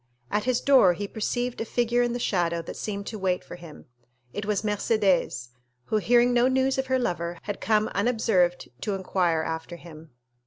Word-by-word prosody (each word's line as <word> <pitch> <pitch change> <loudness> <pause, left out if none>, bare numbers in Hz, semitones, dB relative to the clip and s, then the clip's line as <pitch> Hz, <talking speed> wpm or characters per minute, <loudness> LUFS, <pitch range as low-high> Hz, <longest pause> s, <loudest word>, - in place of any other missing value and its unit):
At 210 +2 0
his 255 -1 +1
door 260 -10 +6
he 200 +4 -5
perceived 245 +4 -2
a - - +1
figure 240 +1 +1
in 240 0 +1
the - - -2
shadow 170 -7 0
that - - -8
seemed 200 -1 -4
to 215 0 -6
wait 185 -1 0
for - - -9
him. 170 -3 -12 0.5
It 205 0 -4
was 210 -1 0
Mercédès, 200 - +1 0.4
who, 215 - 0
hearing 240 +3 +3
no 245 +1 +4
news 265 +1 +1
of 265 - -1
her 260 0 +2
lover, 175 -7 -2
had 205 -1 -5
come 215 -1 +2
unobserved 200 -5 +1
to 205 - -1
inquire 180 -4 0
after 160 +2 -5
him. 165 -2 -13
205 Hz, 190 wpm, -26 LUFS, 175-240 Hz, 0.5 s, door